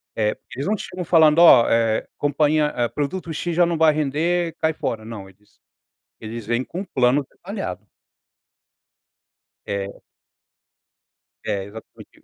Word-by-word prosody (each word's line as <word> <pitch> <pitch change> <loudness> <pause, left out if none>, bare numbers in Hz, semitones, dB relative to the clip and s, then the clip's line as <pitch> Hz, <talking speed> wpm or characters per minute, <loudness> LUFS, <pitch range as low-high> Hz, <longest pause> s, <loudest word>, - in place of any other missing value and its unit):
Eh, 105 -1 0 0.2
eles 140 +3 -4
não 215 - +1
chegam 180 -2 -6
falando: 160 -2 +5
"Ó, 135 -9 +8 0.5
companhia 145 -3 +1
produto 165 +5 -3
"x" 170 +3 -3
já 175 +1 +5
não 170 -1 -1
vai 160 -1 +5
render, 160 +4 -1
cai 160 0 +1
fora". 110 -7 -4
Não, 105 -4 -8
eles 100 +2 -27 0.6
eles 110 0 -7
vêm 120 +3 0
com 175 - -6
um - - -4
plano 130 -3 +1
detalhado. - - -7 1.8
É. 100 -1 -5 1.4
É, 100 -1 -2
exatamente 105 +3 -13
145 Hz, 130 wpm, -22 LUFS, 115-165 Hz, 1.8 s, Ó